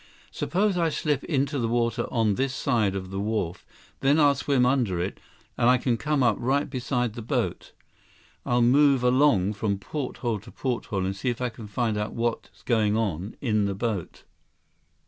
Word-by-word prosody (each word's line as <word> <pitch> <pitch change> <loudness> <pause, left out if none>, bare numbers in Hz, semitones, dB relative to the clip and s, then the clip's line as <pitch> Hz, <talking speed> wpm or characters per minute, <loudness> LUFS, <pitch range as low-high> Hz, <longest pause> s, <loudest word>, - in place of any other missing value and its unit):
Suppose 190 0 0
I 165 -1 +2
slip 150 -2 -1
into 140 -1 0
the 115 - 0
water 115 0 0
on 110 -3 +1
this 130 +4 -1
side 105 -7 +1
of 95 -1 -5
the 95 - -3
wharf. 100 -4 -2 0.4
Then 140 +3 +3
I'll 145 -2 +6
swim 140 -3 +1
under 125 -9 +1
it, 90 +3 -3 0.4
and 120 0 +4
I 125 - +6
can 125 -1 0
come 145 +4 0
up 115 -3 +3
right 135 +4 +1
beside 125 -3 -2
the 120 - -7
boat. 110 - -2 0.7
I'll 120 0 +2
move 135 +1 +4
along 125 -6 +3
from 100 -1 -1
porthole 120 -1 -3
to 100 - -14
porthole 115 -7 -2
and 95 +1 -2
see 110 +6 -2
if 120 - -3
I 125 -1 -1
can 115 -2 -10
find 110 0 -1
out 105 - -3
what's 115 0 -3
going 110 -3 +2
on 100 -3 -2
in 110 -5 +1
the 100 -1 -2
boat." 105 -4 -3
120 Hz, 185 wpm, -26 LUFS, 105-135 Hz, 0.7 s, I'll